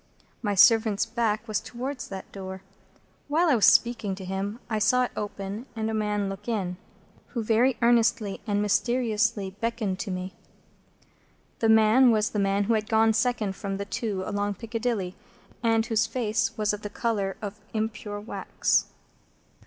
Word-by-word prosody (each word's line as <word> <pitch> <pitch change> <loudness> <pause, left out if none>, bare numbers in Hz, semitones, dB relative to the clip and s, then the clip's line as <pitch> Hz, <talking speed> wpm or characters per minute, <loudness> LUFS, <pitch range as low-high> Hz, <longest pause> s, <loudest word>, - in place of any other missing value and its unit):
My 205 -4 -1
servant's 220 0 +5
back 225 -1 -1
was 215 -2 0
towards 245 +5 -6
that 190 -1 -8
door. 190 -1 -7 0.6
While 325 +4 +2
I 280 - +5
was 215 - +5
speaking 230 -5 +3
to 190 -1 -8
him, 195 +3 -3
I 220 -2 -1
saw 250 +4 +3
it 250 - -2
open, 205 +3 -5
and 220 0 -2
a - - -3
man 210 -2 0
look 195 +2 -7
in, 190 -6 -2 0.5
who 235 -4 -4
very 235 +3 +3
earnestly 230 -4 +2
and 205 0 +1
mysteriously 215 -1 0
beckoned 225 -5 -1
to 200 - -4
me. 185 0 -4 1.3
That 225 - +2
man 220 +4 +6
was 215 -2 +2
the 210 - -1
man 200 0 +2
who 230 - +1
had 215 -1 -1
gone 220 0 +4
second 230 -2 +1
of 195 -1 -2
the 200 - -4
two 200 -2 -3
along 205 -1 -2
Piccadilly, 225 -3 -3 0.5
and 225 -1 +2
whose 225 -2 +1
face 225 -2 -1
was 210 -1 +1
of 210 - -5
the 205 - -5
colour 205 -4 -2
of 205 0 -6
impure 215 -1 -3
wax. 210 - 0
215 Hz, 165 wpm, -26 LUFS, 200-230 Hz, 1.3 s, man